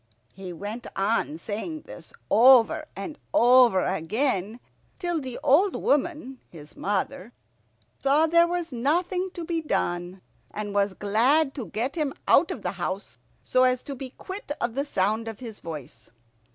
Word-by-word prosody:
He 190 -2 -8
went 205 +7 -6
on 195 -5 0
saying 225 - -5
this - - -12 0.2
over 250 +6 +6
and 200 +11 -7 0.2
over 245 -7 +6
again, 205 - -1 0.4
till 345 -3 -2
the 255 -2 -6
old 340 +8 +4
woman 290 -3 -1
his 150 -3 -13
mother 205 +2 -3 0.7
saw 285 +3 +4
there 335 +1 +4
was 345 -2 -3
nothing 350 +9 0
to 340 -2 -5
be 330 0 -1
done, 175 - -2 0.3
and 205 -1 -5
was 200 -1 +1
glad 265 +9 +2
to 255 -7 -6
get 245 +6 -2
him 300 -4 -2
out - - +5
of - - -6
the - - -1
house - - -5 0.2
so 255 0 +3
as 255 -1 +2
to 280 - -6
be 260 0 -7
quit 375 +5 -8
of 235 -1 -1
the 275 +3 -1
sound 215 -2 0
of 225 -2 -6
his 230 -4 -8
voice. 140 -9 -9
250 Hz, 155 wpm, -26 LUFS, 205-300 Hz, 0.7 s, over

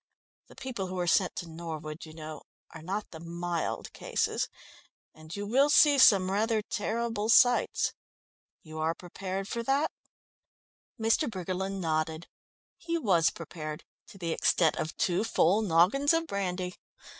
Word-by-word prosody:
The - - -16
people 235 -8 -5
who 185 0 -5
are 180 - 0
sent 180 +2 +2
to 175 - -5
Norwood, 160 -1 -7
you 155 - -11
know, 155 -2 -8 0.3
are 165 - -10
not 195 +6 -4
the 160 - -9
mild 170 0 -3
cases, - - -1 0.6
and 155 +1 -10
you 205 0 -4
will 270 +7 +3
see 290 -1 +6
some 190 -6 +6
rather 215 +2 +1
terrible 220 0 -2
sights. 245 +1 +4 0.7
You 155 -1 -8
are 160 +1 0
prepared 190 +2 -5
for 235 - -3
that?" 275 +6 +1 1.1
Mr. 225 +6 +2
Briggerland 190 0 -3
nodded. 160 0 -1 0.5
He 335 0 -2
was 180 - +3
prepared 155 -2 -7 0.2
to 230 - -14
the 170 -3 -3
extent 160 0 +2
of 155 - -4
two 180 +3 +1
full 210 -2 +3
noggins 210 - +3
of 330 0 +1
brandy. 185 - -3
185 Hz, 145 wpm, -29 LUFS, 165-225 Hz, 1.1 s, see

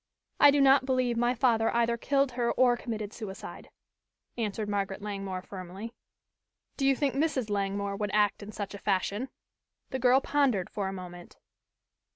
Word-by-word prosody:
"I 290 - +9
do 285 0 +3
not 270 -1 +5
believe 255 -2 +1
my 240 +2 +1
father 225 -2 +2
either 235 0 +2
killed 275 +2 +1
her 240 -1 0
or 250 -1 +4
committed 220 -3 -5
suicide," 200 -4 -8 0.7
answered 215 -2 -2
Margaret 200 -1 -2
Langmore 195 -3 -4
firmly. 195 +5 -8 0.8
"Do 270 - 0
you 275 - +4
think 280 0 0
Mrs. 275 -6 0
Langmore 200 0 -1
would 210 0 -2
act 210 -1 +2
in 205 +1 -8
such 205 -1 -5
a 200 - -7
fashion?" 205 +6 -1 0.6
The 260 - -2
girl 255 +1 +5
pondered 270 -11 +1
for 200 -2 -2
a - - -3
moment. 175 -2 -9
225 Hz, 165 wpm, -29 LUFS, 200-255 Hz, 0.8 s, I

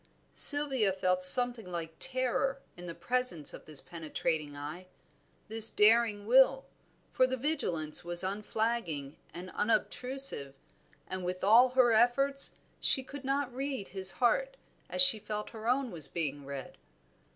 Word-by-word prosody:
Sylvia 270 -8 +7
felt 185 -1 -3
something 230 0 +4
like 165 -2 -7
terror 260 +1 -1 0.2
in 175 0 -12
the 170 - -9
presence 250 - 0
of - - -13
this 150 -3 -6
penetrating 155 -2 -6
eye, 155 +6 -10 0.6
this 225 +1 +3
daring 215 -1 0
will, 265 +3 +2 0.5
for 255 - 0
the 260 0 -5
vigilance 180 - -4
was 175 +1 +1
unflagging 200 -7 -5 0.2
and 180 +1 -11
unobtrusive, 230 - -3 0.5
and 185 -1 -7
with 180 +1 -7
all 230 +6 +4
her 250 -1 +1
efforts 275 +5 +1 0.2
she 265 - +1
could 280 +2 -12
not 270 -1 -4
read 265 -5 -7
his 190 0 +3
heart - - -2 0.3
as 275 - +6
she 250 -6 +7
felt 210 0 -8
her 225 0 -7
own 255 0 -2
was 160 -5 -3
being 145 -4 -7
read. 140 -1 -10
220 Hz, 140 wpm, -28 LUFS, 175-255 Hz, 0.6 s, Sylvia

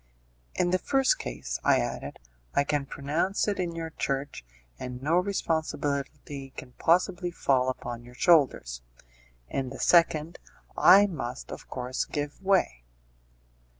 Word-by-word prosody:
"In 175 - +1
the 185 - +2
first 270 +4 +2
case," - - -5
I - - +5
added, - - -3 0.4
"I 140 - +4
can 145 -1 -1
pronounce 155 +11 -1
it 205 -2 -1
in 175 -2 -2
your 165 -1 -5
church, 140 - -3 0.4
and 125 -1 -6
no 155 +6 +1
responsibility 145 -6 -2
can 130 - -8
possibly 180 +1 +2
fall 130 -6 +1
upon 120 -2 -5
your 125 +1 -14
shoulders; 130 - +3 0.7
in 130 - -3
the 135 - -8
second, 165 -1 +3 0.4
I 195 +3 +7
must, 125 - -5
of - - -8
course, 125 +1 -3
give 145 +1 -5
way." 190 - +1
145 Hz, 135 wpm, -28 LUFS, 130-175 Hz, 0.7 s, I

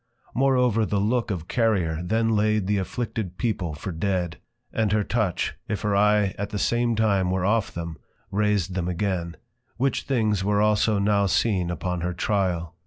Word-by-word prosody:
Moreover 125 -4 +3
the 100 0 0
Look 115 +4 +1
of 90 -5 -4
Carrier 95 -10 +1
then 115 +5 +1
laid 105 -1 +2
the 100 +1 +1
Afflicted 95 -2 -4
People 95 -10 -2
for 95 +6 -5
dead; 90 0 -1 0.4
and 110 -3 +1
her 105 0 +2
Touch, 110 -5 -1
if 105 - -2
her 105 -1 0
Eye 105 -1 +3
at 100 0 -2
the 105 - -4
same 120 +2 +1
time 100 -4 +2
were 95 0 0
off 105 +1 +1
them, 85 -2 -6 0.3
raised 100 -3 +1
them 90 -2 -2
again: 90 -2 -2 0.4
Which 135 +2 +1
Things 110 -7 +1
were 100 +1 +2
also 105 0 +3
now 100 0 +2
seen 95 -2 +1
upon 85 +1 -3
her 90 +1 -2
Tryal. 90 -4 -1
100 Hz, 175 wpm, -25 LUFS, 90-110 Hz, 0.4 s, Moreover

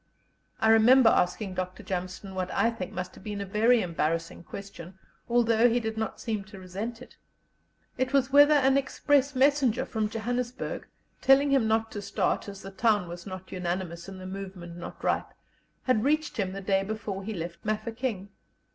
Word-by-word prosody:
I 220 - +3
remember 230 +2 +7
asking 185 +2 +1
Dr. 185 0 -4
Jameson 185 +1 -5
what 185 -1 -2
I 230 +4 +3
think 190 -6 -6
must 180 0 -5
have - - -14
been 205 -1 -4
a 200 - -3
very 225 +5 +3
embarrassing 165 0 -2
question, 190 -1 -9 0.3
although 235 0 +4
he 235 +1 +2
did 220 -1 -3
not 220 0 -3
seem 220 -4 -3
to 200 0 -12
resent 210 +6 -6
it. - - -17 0.8
It 260 0 0
was 275 -1 +2
whether 290 +1 +8
an 270 -1 +4
express 280 0 +1
messenger 265 -3 +3
from 215 -2 -2
Johannesburg, 245 +3 -3 0.3
telling 275 +1 +5
him 265 -5 +3
not 220 0 +1
to 205 - -5
start, 200 +1 -1
as 200 -1 -9
the 195 - -8
town 205 -2 +2
was 175 +1 -8
not 185 -1 -8
unanimous 175 -1 -3
and 190 -1 -8
the 185 - -8
movement 185 -2 -7
not 175 - -9
ripe, - - 0 0.5
had 235 -4 +2
reached 305 +2 +1
him 190 -3 -1
the 195 - -5
day 195 0 +2
before 205 -1 -4
he 215 +2 -4
left 170 0 -6
Mafeking. 215 -1 -3
210 Hz, 180 wpm, -28 LUFS, 185-240 Hz, 0.8 s, whether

